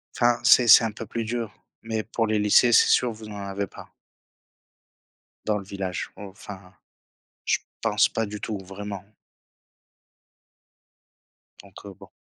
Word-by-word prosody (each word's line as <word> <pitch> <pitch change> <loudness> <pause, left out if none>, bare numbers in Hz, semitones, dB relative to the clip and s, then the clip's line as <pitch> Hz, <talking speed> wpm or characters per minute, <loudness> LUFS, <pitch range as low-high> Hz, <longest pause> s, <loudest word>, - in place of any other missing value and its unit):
Enfin, 120 -1 +2
c'est 125 0 +6
c'est 115 - +9
un 115 - -1
peu 110 +2 -8
plus 115 +1 -4
dur, 115 -2 -4 0.3
mais 110 -1 -3
pour 115 +1 -2
les 110 0 0
lycées, 105 +4 +4
c'est - - +6
sûr, 125 -1 +3
vous 110 0 -11
en 105 - -8
avez 100 0 -4
pas - - -13 1.6
dans 105 -1 0
le 100 - -7
village. 95 -2 -5
Enfin, 100 -2 -11 0.7
je - - +1 0.2
pense - - +2
pas 115 -1 -2
du 105 0 -8
tout 105 -2 -4
vraiment 95 +1 -8 2.6
donc, 100 0 -15
heu, 100 - -9
bon. - - -16
105 Hz, 145 wpm, -24 LUFS, 100-115 Hz, 2.6 s, c'est